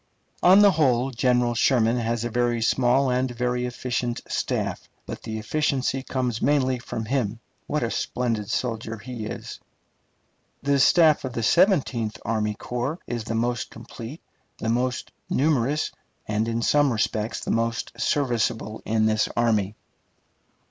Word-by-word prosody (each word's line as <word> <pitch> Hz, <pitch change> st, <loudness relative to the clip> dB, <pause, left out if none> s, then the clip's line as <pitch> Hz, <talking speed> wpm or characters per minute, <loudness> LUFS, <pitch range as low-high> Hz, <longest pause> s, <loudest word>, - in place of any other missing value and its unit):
On 190 Hz, +3 st, +7 dB
the 200 Hz, -, +7 dB
whole, 135 Hz, -6 st, +2 dB
General 125 Hz, -1 st, +2 dB
Sherman 120 Hz, -1 st, +3 dB
has 115 Hz, 0 st, -1 dB
a 120 Hz, -, -3 dB
very 120 Hz, 0 st, +1 dB
small 125 Hz, +3 st, +2 dB
and 125 Hz, +1 st, +1 dB
very 125 Hz, 0 st, -1 dB
efficient 120 Hz, -1 st, -2 dB
staff; -, -, -2 dB, 0.2 s
but -, -, -7 dB
the 110 Hz, 0 st, -5 dB
efficiency 135 Hz, +2 st, 0 dB
comes 125 Hz, -4 st, -2 dB
mainly 130 Hz, -3 st, +2 dB
from 115 Hz, -2 st, -5 dB
him. 115 Hz, -3 st, -1 dB, 0.3 s
What 150 Hz, -3 st, -1 dB
a 115 Hz, -, -1 dB
splendid 115 Hz, -5 st, -2 dB
soldier 115 Hz, -2 st, -2 dB
he 115 Hz, 0 st, -6 dB
is! -, -, -7 dB, 1.0 s
The 140 Hz, 0 st, +2 dB
staff 155 Hz, +2 st, +5 dB
of 130 Hz, -2 st, -4 dB
the 115 Hz, -, -2 dB
Seventeenth 130 Hz, -, +2 dB
Army 105 Hz, -1 st, 0 dB
Corps 125 Hz, +8 st, -3 dB
is 120 Hz, -2 st, -4 dB
the 115 Hz, -, -3 dB
most 120 Hz, +1 st, -1 dB
complete, 115 Hz, +5 st, -9 dB, 0.3 s
the 110 Hz, -, -3 dB
most 125 Hz, +2 st, -1 dB, 0.2 s
numerous, 145 Hz, 0 st, +1 dB, 0.4 s
and 105 Hz, +1 st, 0 dB
in 115 Hz, 0 st, -1 dB
some 145 Hz, +1 st, +3 dB
respects 110 Hz, -1 st, -1 dB
the -, -, -1 dB
most 115 Hz, 0 st, -1 dB
serviceable 115 Hz, -5 st, 0 dB
in 110 Hz, 0 st, +1 dB
this 110 Hz, 0 st, +2 dB
army. 110 Hz, -4 st, +1 dB
120 Hz, 145 wpm, -25 LUFS, 115-130 Hz, 1.0 s, On